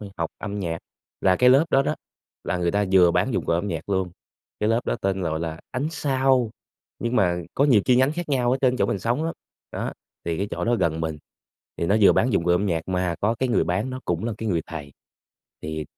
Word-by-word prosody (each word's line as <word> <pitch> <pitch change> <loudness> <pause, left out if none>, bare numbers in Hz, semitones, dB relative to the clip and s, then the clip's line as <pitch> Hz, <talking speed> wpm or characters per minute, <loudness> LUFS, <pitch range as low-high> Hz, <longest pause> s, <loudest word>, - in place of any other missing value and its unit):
h - - -7
học 85 -1 -2
âm 105 -1 -5
nhạc, 85 -4 -2 0.4
là 95 -1 +4
cái 125 +4 +5
lớp 135 +4 +6
đó 135 - +4
đó - - -1 0.5
là - - -1
người 85 -1 0
ta 100 +2 +1
vừa 90 -2 +6
bán 130 - +1
dụng 95 -6 -1
cụ - - +1
âm 90 +5 0
nhạc - - -4
luôn, 95 -2 0 0.5
cái 105 - +1
lớp 115 +1 +2
đó - - 0
tên 95 -1 0
gọi 80 -2 -1
là 80 -1 -4
Ánh 130 +4 -2
Sao, 135 -5 +1 0.5
nhưng 120 +1 -1
mà 90 -5 +2 0.2
có 140 - +3
nhiều 125 -8 +5
chi 125 - +4
nhánh 130 +3 +3
khác 175 -1 -5
nhau 125 -4 +1
ở 130 - +1
trên 130 -1 +3
chỗ 100 - +2
mình 100 - -1
sống 120 - -1
lắm. 165 - -2 0.4
Đó, - - -3 0.3
thì 85 -1 -1
cái 100 - -2
chỗ - - -3
đó 120 +1 +2
gần 80 -6 0
mình 80 -2 -3 0.6
thì 85 - -1
nó 100 +5 +3
vừa 100 - +7
bán 125 +2 +2
dụng 90 -4 +1
cụ 90 - +2
âm 90 +4 +2
nhạc 85 -4 0
mà 90 -2 0
có 110 +3 +2
cái 130 - 0
người 115 - +2
bán 90 +9 -1
nó 130 - -5
cũng 85 +4 -1
là 120 - -1
cái 110 - -3
người 85 -5 0
thầy, 75 -4 -8 0.7
thì 80 0 -4
100 Hz, 255 wpm, -24 LUFS, 85-125 Hz, 0.7 s, vừa